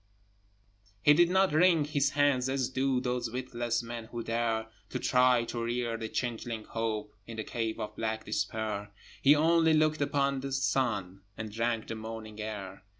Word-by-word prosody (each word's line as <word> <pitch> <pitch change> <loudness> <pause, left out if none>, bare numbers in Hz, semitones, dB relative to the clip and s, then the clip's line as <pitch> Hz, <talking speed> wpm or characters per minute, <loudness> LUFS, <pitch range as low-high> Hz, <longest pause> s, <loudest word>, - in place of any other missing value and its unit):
He 150 - +8
did 175 +3 +5
not 190 -2 +3
wring 165 -1 +5
his 145 -2 +1
hands, 140 -3 +2
as 135 -2 0
do 130 0 +1
Those 125 -2 -2
witless 120 -1 -2
men 115 -1 -6
who 120 +1 -6
dare 115 -1 0 0.2
To - - -3
try 125 -1 +4
to 115 0 -4
rear 120 0 -1
the 110 -1 -5
changeling 115 -2 -3
Hope 110 -2 -3
In 115 -1 -7
the 110 - -2
cave 115 0 -3
of 105 -1 -5
black 110 0 -3
Despair: 105 -1 -2 0.3
He 145 +2 +7
only 160 +1 +4
looked 155 -1 +2
upon 140 -1 +1
the 135 0 -4
sun, 110 -8 0 0.2
And 110 -1 -5
drank 115 +1 -1
the - - -5
morning 110 -1 -7
air. 100 -3 -6
120 Hz, 170 wpm, -30 LUFS, 110-135 Hz, 0.3 s, He